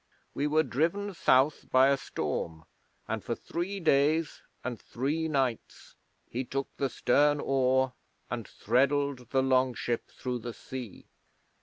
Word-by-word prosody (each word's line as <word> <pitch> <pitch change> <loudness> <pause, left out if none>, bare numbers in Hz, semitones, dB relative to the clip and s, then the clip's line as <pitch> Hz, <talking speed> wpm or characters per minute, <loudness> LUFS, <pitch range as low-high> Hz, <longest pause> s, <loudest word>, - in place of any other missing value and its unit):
'We 145 - 0
were 155 +1 +3
driven 170 +9 0
South 140 -3 +3
by 130 +1 +6
a 140 - +4
storm, 80 - -4 0.4
and - - -3
for - - -2
three 185 +4 -4
days 155 0 +2 0.2
and 120 -4 -4
three 150 +6 -2
nights 135 -6 -2 0.3
he 125 +3 -3
took 135 +2 -4
the 135 - 0
stern 145 +5 +3
oar, 130 -1 +2 0.3
and 115 -3 -4
threddled 135 +1 +1
the 135 -1 +2
longship 130 -2 +1
through 125 -1 -4
the 120 0 -6
sea. 125 -5 -8
135 Hz, 135 wpm, -29 LUFS, 125-150 Hz, 0.4 s, by